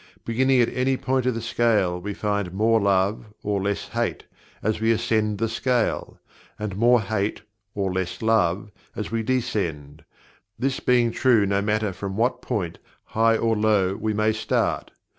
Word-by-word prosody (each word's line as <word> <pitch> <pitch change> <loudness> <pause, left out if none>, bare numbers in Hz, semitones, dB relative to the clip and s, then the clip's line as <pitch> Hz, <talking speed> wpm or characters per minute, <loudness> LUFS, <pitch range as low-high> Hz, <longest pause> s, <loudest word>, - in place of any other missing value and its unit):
Beginning 130 +3 +2
at 120 - +2
any 130 +1 +1
point 130 -1 0
of 125 - +1
the 115 - -4
scale 105 -7 +1
we 100 +1 -5
find 100 -3 -2
"more 110 +3 +3
love," 100 +2 +1 0.2
or 100 -1 0
"less 100 +1 -2
hate," - - -2 0.4
as 110 0 0
we 110 +1 +3
ascend 110 -2 +1
the 115 +3 0
scale; 120 +1 -1 0.4
and 105 -3 -4
"more 120 +4 +5
hate" 105 0 -2 0.3
or 95 -2 -1
"less 95 -1 -3
love" 105 -2 +1 0.2
as 105 - -4
we 115 0 0
descend 85 - -2 0.5
this 135 +1 -1
being 120 -2 +3
true 115 -4 +3
no 100 0 +1
matter 105 -1 0
from 95 +1 -5
what 120 +3 +1
point, 95 -9 -3 0.3
high 115 0 +4
or 115 0 +1
low, 105 -3 +2
we 110 +1 -2
may 110 +1 +1
start. 110 - -1
110 Hz, 165 wpm, -24 LUFS, 100-115 Hz, 0.5 s, more